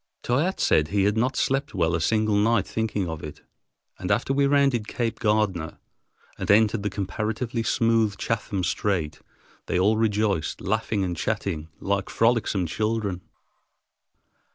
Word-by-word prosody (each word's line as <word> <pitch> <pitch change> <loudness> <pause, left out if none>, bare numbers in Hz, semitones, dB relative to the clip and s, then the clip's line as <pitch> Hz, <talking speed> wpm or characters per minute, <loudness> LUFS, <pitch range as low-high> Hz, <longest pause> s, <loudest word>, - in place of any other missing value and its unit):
Toyatte 150 +10 0
said 75 -1 +3
he 100 +3 +1
had 105 +1 +2
not 125 +3 +1
slept 135 +3 0
well 85 -2 +1
a 80 - 0
single 110 +4 +2
night 105 0 +3
thinking 105 -4 -2
of 80 -1 -6
it, 75 - -9 0.6
and - - -4
after 135 - +1
we 140 0 +3
rounded 140 -6 +2
Cape 115 -2 -2
Gardner 105 -8 0 0.6
and - - -4
entered 110 +1 +4
the 105 - -1
comparatively 110 +4 -3
smooth 115 -3 +1
Chatham 105 -4 -2
Strait, 90 -6 -1 0.5
they - - 0
all 105 +4 +3
rejoiced, 105 -6 0
laughing 110 0 -1
and 90 -2 -2
chatting 85 -5 -3
like 100 -1 -1
frolicsome 115 -5 +1
children. 105 0 -2
105 Hz, 145 wpm, -25 LUFS, 95-115 Hz, 0.6 s, entered